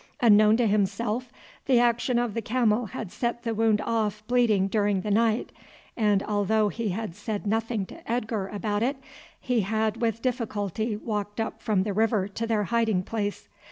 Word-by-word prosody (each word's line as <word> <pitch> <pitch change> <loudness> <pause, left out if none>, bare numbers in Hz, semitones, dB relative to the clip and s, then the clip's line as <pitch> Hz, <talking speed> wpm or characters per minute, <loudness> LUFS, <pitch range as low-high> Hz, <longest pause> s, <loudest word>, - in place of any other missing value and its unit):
Unknown 215 -3 +6
to 240 - +2
himself 215 +4 0 0.4
the 255 -3 +5
action 240 +1 +2
of 240 -3 0
the 230 - -2
camel 230 0 +1
had 190 0 -6
set 235 0 -2
the 230 -2 -1
wound 220 -1 +2
off 215 -2 -1
bleeding 225 -5 +3
during 205 -2 +1
the 210 - -3
night, 225 +2 +2 0.4
and 210 -3 +2
although 210 +1 +1
he 230 0 -3
had 210 -1 -3
said 205 +2 -5
nothing 225 0 -1
to 220 - -9
Edgar 225 -4 -1
about 205 0 -2
it, 265 +4 0 0.4
he 250 -3 0
had 220 +2 0
with 230 -1 0
difficulty 220 -3 -2
walked 210 -1 -4
up 220 0 -3
from 210 -5 +1
the 205 0 -2
river 215 -2 +1
to 225 +3 -4
their 220 -2 +1
hiding 220 -3 +1
place. 205 0 -3
220 Hz, 175 wpm, -26 LUFS, 205-230 Hz, 0.4 s, Unknown